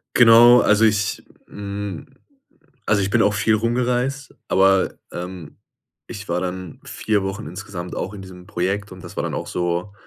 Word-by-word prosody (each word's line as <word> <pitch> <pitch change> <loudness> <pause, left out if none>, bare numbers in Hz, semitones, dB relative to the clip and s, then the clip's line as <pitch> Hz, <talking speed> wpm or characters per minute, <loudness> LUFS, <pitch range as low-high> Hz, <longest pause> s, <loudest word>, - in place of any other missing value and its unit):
Genau, 120 +1 +8
also, 105 +2 +4
ich 105 -2 +1 0.3
hm, 100 -3 -6 0.8
also, 105 -1 +2
ich 95 - -1
bin - - +3
auch 105 +1 +3
viel 110 +2 +1
rumgereist, 125 +4 -1
aber, 95 0 +3 0.2
ähm, 90 -3 -8 0.5
ich 100 -4 -9
war 85 +1 0
dann 90 -2 -5
4 105 -2 -1
Wochen 95 -5 -5
insgesamt 90 0 -7
auch 95 - -4
in 100 - -8
diesem 90 -1 -12
Projekt 100 +1 -2
und 90 - -13
das - - -11
war - - -1
dann - - -3
auch - - -4
so, 90 +2 -2
100 Hz, 165 wpm, -21 LUFS, 90-110 Hz, 0.8 s, Genau